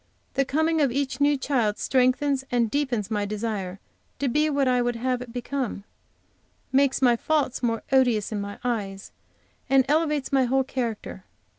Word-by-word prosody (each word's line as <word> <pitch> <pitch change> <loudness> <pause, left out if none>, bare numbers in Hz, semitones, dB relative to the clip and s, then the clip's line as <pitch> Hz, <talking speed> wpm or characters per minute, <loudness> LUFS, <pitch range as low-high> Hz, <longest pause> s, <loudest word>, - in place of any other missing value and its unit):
The 275 0 +1
coming 315 +3 +1
of 275 -4 +3
each 275 +2 -2
new 290 0 +4
child 245 -6 0
strengthens 265 +1 +1
and 235 -3 +1
deepens 245 -7 -1
my 210 -1 0
desire 205 -3 -3 0.4
to 280 - -1
be 300 +5 +2
what 280 -2 +1
I 250 -1 +3
would 240 0 0
have 250 +1 -1
it 245 -2 -8
become; 245 -3 -3 0.9
makes 270 0 +2
my 240 -2 +5
faults 290 0 0
more 230 -2 -1
odious 245 -6 +3
in 210 -2 -2
my 200 0 -6
eyes, 205 -5 -3 0.6
and 270 -1 +5
elevates 300 -2 +1
my 265 -2 +4
whole 265 +2 +2
character. 235 -7 -4
255 Hz, 165 wpm, -25 LUFS, 230-275 Hz, 0.9 s, my